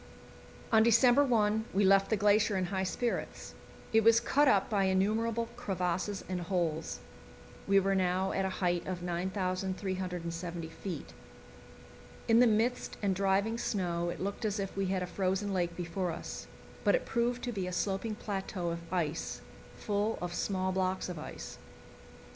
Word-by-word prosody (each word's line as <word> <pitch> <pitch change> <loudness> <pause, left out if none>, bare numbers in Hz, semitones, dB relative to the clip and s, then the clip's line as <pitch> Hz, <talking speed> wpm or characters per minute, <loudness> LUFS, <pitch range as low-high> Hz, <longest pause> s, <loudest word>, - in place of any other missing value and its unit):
On 220 -1 +6
December 240 +4 +6
1 220 -4 +2
we 200 0 +4
left 195 0 +5
the 220 - +2
glacier 205 0 +3
in 185 - 0
high 190 - 0
spirits. 230 +5 -3 0.4
It 225 0 +5
was 230 +1 +6
cut 285 +5 +3
up 200 -6 +4
by 200 -3 +1
innumerable 220 +5 +1
crevasses 190 -3 -2
and 185 -1 -3
holes. 165 -3 -2 0.7
We 195 0 +5
were 195 0 +1
now 185 0 +1
at 195 - 0
a 190 - 0 0.2
height 175 -1 0
of 180 -1 -4
9,370 180 -2 -3
feet. 180 +2 -7 1.1
In 225 0 +5
the 245 - +7
mist 225 +3 0
and 195 -1 +2
driving 200 +4 +1
snow 175 -6 -1
it - - -5
looked 200 +4 -3
as 210 -1 -1
if 195 -1 -4
we 195 -1 0
had 185 -1 0
a - - -1
frozen 190 +2 -1
lake 175 -2 -1
before 175 +1 -2
us; 165 - -6 0.4
but - - +4
it - - -1
proved 240 +1 0
to 245 - -2
be 195 -5 -3
a - - -3
sloping 195 +4 -1
plateau 190 -4 -3
of 170 0 -7
ice, 160 - -2 0.4
full 210 +2 -1
of 175 -1 -4
small 185 0 -1
blocks 185 0 -1
of 175 -3 -5
ice. - - -8
190 Hz, 165 wpm, -31 LUFS, 180-215 Hz, 1.1 s, the